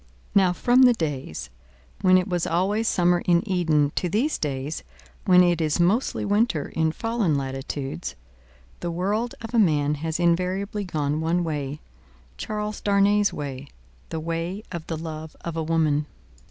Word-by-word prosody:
Now, 190 -2 +5
from 245 +8 +3
the 250 -2 +7
days 135 - -4 0.5
when 185 -1 +6
it 185 +1 0
was 175 -3 -1
always 200 +6 +1
summer 175 0 +3
in 175 +3 +3
Eden, 160 -6 +2
to 180 - 0
these 245 - 0
days 140 +1 -3 0.4
when 180 -1 +7
it 175 -2 +2
is 155 +1 0
mostly 195 +9 +1
winter 205 -7 +1
in 160 -1 0
fallen 225 -6 0
latitudes, 135 - -4 0.6
the 175 - -3
world 205 +8 -1
of 225 +1 -7
a 235 - +4
man 150 -7 +3
has 160 0 -2
invariably 185 +4 0
gone 150 -3 -1
one 170 +2 +1
way 150 -3 -3 0.5
Charles 210 0 -4
Darnay's 205 0 +3
way 140 -2 -6 0.4
the 160 - -3
way 170 +5 -3
of 170 -3 -6
the 165 - -3
love 160 -1 -7
of 170 -1 -5
a 165 - -1
woman. 155 -2 +1
170 Hz, 155 wpm, -24 LUFS, 155-200 Hz, 0.6 s, the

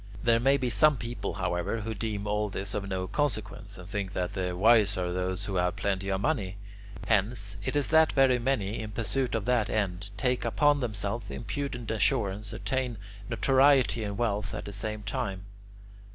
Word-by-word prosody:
There 115 -2 +4
may 135 +3 +4
be 125 -2 -1
some 150 +3 +5
people, 115 -4 -4
however, 90 +4 -1
who 110 +1 -3
deem 105 -1 -3
all 105 0 0
this 95 +1 -4
of 100 -1 -3
no 95 -1 -2
consequence, 110 -6 -2
and 90 0 -10
think 100 -1 -3
that 90 -2 -2
the 90 -1 -2
wise 105 -1 +5
are 90 -1 -1
those 90 0 -2
who 95 -2 -2
have 90 +1 +1
plenty 95 0 -1
of 95 0 0
money. 100 -9 -1 0.5
Hence 105 -1 0
it - - -2
is 145 -1 +1
that 160 0 +5
very 130 -2 +4
many, 115 -5 -1
in 110 - -5
pursuit 115 +4 -1
of 110 - -2
that 120 -3 +2
end, 100 -2 -1
take 125 +3 +1
upon 145 -1 +3
themselves 105 -3 -3
impudent 125 -2 -4
assurance, 105 -3 0
and - - -7
attain 130 -3 -1 0.3
notoriety 130 0 +4
and 100 -1 -4
wealth 105 -2 -1
at - - -5
the 100 - -7
same 105 +1 -4
time. 100 -2 -3
105 Hz, 185 wpm, -29 LUFS, 100-120 Hz, 0.5 s, some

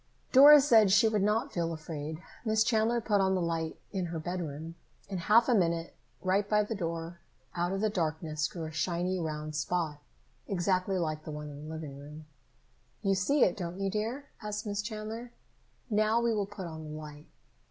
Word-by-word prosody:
Dora 290 +3 +10
said 225 -7 +6
she 210 +4 +5
would 215 -2 +1
not 220 +7 +1
feel 170 -3 -1
afraid. 155 0 -6 0.2
Miss 220 -1 +3
Chandler 230 +1 +2
put 205 -3 +2
out 190 0 +2
the - - +1
light 165 -2 -2
in 185 -3 -2
her 165 0 -4
bedroom. 160 -2 -4 0.4
In 190 -2 -3
half 220 +7 +5
a 250 - +4
minute, 170 -5 +1 0.3
right 195 +2 +1
by 210 0 +4
the 210 - -4
door, 170 -3 -4 0.4
out 175 +1 0
of 195 +1 -2
the 215 - +2
darkness 155 -4 -1
grew 165 -3 -6
a 155 - -6
shiny 175 +3 -1
round 155 -2 -4
spot, 150 +1 -1 0.5
exactly 185 0 0
like 155 -3 -2
the - - -8
one 150 -1 -6
in 145 +1 -9
the - - -6
living 155 -3 -7
room. 150 +2 -10 0.8
"You 195 - +3
see 245 +9 +3
it, 180 - +3
don't 175 0 -5
you, 195 0 -1
dear?" 230 +7 -3 0.2
asked 210 0 -4
Miss 205 -1 -2
Chandler. 220 +2 -6 0.5
"Now, 215 +1 +2
we 235 -1 +1
will 205 -2 -1
put 200 -2 -7
on 160 -2 -7
the 155 0 -7
light." 150 -1 -10
185 Hz, 195 wpm, -30 LUFS, 160-215 Hz, 0.8 s, Dora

